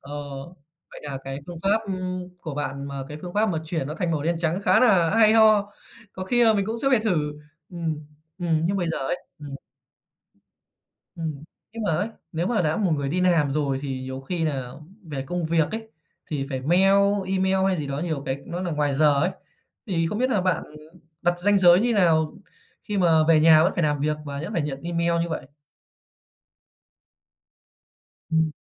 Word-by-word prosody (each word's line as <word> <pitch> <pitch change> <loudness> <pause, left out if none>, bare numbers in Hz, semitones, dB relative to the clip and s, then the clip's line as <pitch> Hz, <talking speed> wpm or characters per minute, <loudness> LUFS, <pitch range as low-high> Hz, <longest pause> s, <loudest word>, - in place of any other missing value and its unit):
Ờ, 140 - -11 0.8
vậy - - -11
nà 140 -2 -5
cái 135 0 -5
phương 175 -2 -8
pháp, 205 +3 +2
ừm, 185 -1 -4
của 155 -4 -6
bạn 140 -1 -4
mà 140 -1 -5
cái 150 - -7
phương 175 -1 -7
pháp 215 +1 +2
mà 170 -5 -1
chuyển 160 -4 -2
nó 150 - -5
thành 175 0 -2
màu 155 -3 -1
đen 170 +2 0
trắng 170 +2 0
khá - - +4
nà 190 -10 +4
hay 220 -1 +5
ho, 215 -2 +5 0.4
có 185 - -6
khi 240 +5 +3
là 225 - +6
mình 200 -2 0
cũng 225 +1 -2
sẽ 270 - +3
phải 255 -4 +4
thử. 165 -9 0 0.4
Ừm, 160 -4 -4 0.3
ừm. 165 -3 +1
Nhưng 195 +4 +1
mà 185 - 0
giờ - - -2
ấy 135 +6 -2 0.2
ừm. 145 -2 -7 1.6
Ừm. 155 -3 -5 0.3
Nhưng 230 0 -5
mà 205 - 0
ấy, 205 +7 -1 0.2
nếu 165 +1 -1
mà 215 -3 +1
đã 155 -1 0
một 200 -5 +1
người 140 -2 -1
đi 175 +6 -1
làm 170 -6 +3
rồi 140 -2 0
thì 135 -2 -4
nhiều 130 0 -6
khi 165 +4 -3
nà 135 -5 -2 0.4
về 135 -2 -3
công 175 +3 -2
việc 160 -1 +1
ấy, 220 0 -5 0.4
thì 140 -3 -3
phải 130 -1 -2
mail 175 +8 +3 0.4
email 190 0 +1
hay 190 -1 +1
gì 150 -3 -3
đó 140 0 -3
nhiều 155 -3 -2
cái 135 +1 -3
nó 175 +1 -4
nà 180 -2 -2
ngoài 150 -2 0
giờ 145 -1 +4
ấy. 175 +5 +2 0.6
Thì 165 -5 0
không 210 +6 -3
biết 255 +2 +1
nà 210 -6 +2
bạn 185 -3 0 0.6
đặt 175 0 +1
ranh 205 +2 +3
giới 175 -1 +6
như 240 +2 +2
nào 160 -6 +3 0.5
khi 210 - -3
mà 165 -3 +4
về 160 -2 +6
nhà 155 0 +7
vẫn 180 - +2
phải 175 - 0
làm 150 -2 +1
việc 150 +1 0
và 140 -1 -5
vẫn 175 +6 -5
phải 170 - 0
nhận 140 -2 -5
email 170 0 0
như 170 - -3
vậy? 160 - -4 2.8
Ừm. 160 -1 +2
165 Hz, 205 wpm, -24 LUFS, 150-190 Hz, 2.8 s, nhà